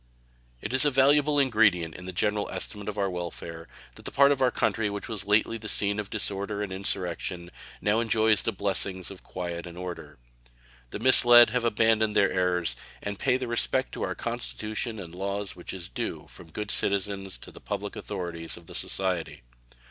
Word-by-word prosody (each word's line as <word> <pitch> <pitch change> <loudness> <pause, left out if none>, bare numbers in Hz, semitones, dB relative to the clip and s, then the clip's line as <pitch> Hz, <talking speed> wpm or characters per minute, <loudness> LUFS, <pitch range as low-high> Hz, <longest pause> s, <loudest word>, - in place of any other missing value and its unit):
It 110 - -4
is 130 - +4
a 145 - +5
valuable 145 +2 +4
ingredient 105 - +3
in 90 - -10
the 95 - -5
general 105 +3 0
estimate 105 -1 -4
of 105 - -6
our 100 -1 +1
welfare 85 -2 -6 0.3
that - - -14
the - - -5
part 140 +1 +5
of 140 -2 0
our 130 - +5
country 110 -3 0
which 100 0 -5
was 105 -4 -5
lately 110 +2 +2
the 110 0 -5
scene 100 +1 +1
of 105 -1 -4
disorder 100 0 -1
and 100 - -5
insurrection 90 -2 -3 0.3
now 105 +2 +2
enjoys 110 -2 +3
the - - -1
blessings 95 -2 -2
of 95 - -11
quiet 85 -1 -5
and 85 0 -10
order. 90 -1 -7 0.7
The - - -5
misled 120 -1 +7
have 125 -1 0
abandoned 110 -1 +2
their 100 - +4
errors, 90 -7 +1 0.3
and 100 -1 -4
pay 130 -1 +2
the 130 -1 -4
respect 120 0 0
to - - -7
our - - -2
Constitution 105 - -4
and 85 -5 -8
laws 100 +2 -3
which 90 - -8
is 90 -2 -5
due - - -4
from 85 - -13
good 105 +5 -4
citizens 100 -1 +1
to - - -12
the - - -14
public - - -4
authorities 85 -2 -5
of 85 - -14
the - - -10
society. 90 -8 -2
100 Hz, 190 wpm, -27 LUFS, 90-110 Hz, 0.7 s, misled